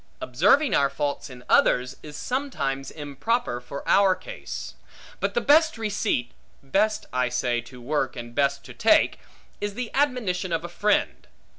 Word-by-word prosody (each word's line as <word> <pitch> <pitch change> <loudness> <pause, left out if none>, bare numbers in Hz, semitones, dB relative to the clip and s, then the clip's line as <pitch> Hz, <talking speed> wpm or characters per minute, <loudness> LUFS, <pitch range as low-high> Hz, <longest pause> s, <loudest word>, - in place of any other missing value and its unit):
Observing 205 - +3
our 140 -1 +3
faults 145 +1 -3
in 125 -1 -11
others, 125 0 +3
is 150 -1 -9
sometimes 140 - -2
improper 145 - -2
for 140 +3 -8
our 195 -2 +5
case. - - -7 0.5
But - - -1
the 480 - +2
best 315 0 +4
receipt 205 - -1 0.3
(best, 205 +10 +1
I 125 -1 +1
say, 120 -1 0
to 125 +1 -13
work, 135 +1 -1
and 120 -1 -8
best 140 +1 +1
to - - -10
take) - - +3 0.4
is 205 -1 -3
the 250 -1 -4
admonition 240 -10 0
of 165 0 -1
a 175 - -6
friend. 205 +4 0
155 Hz, 155 wpm, -25 LUFS, 130-220 Hz, 0.5 s, our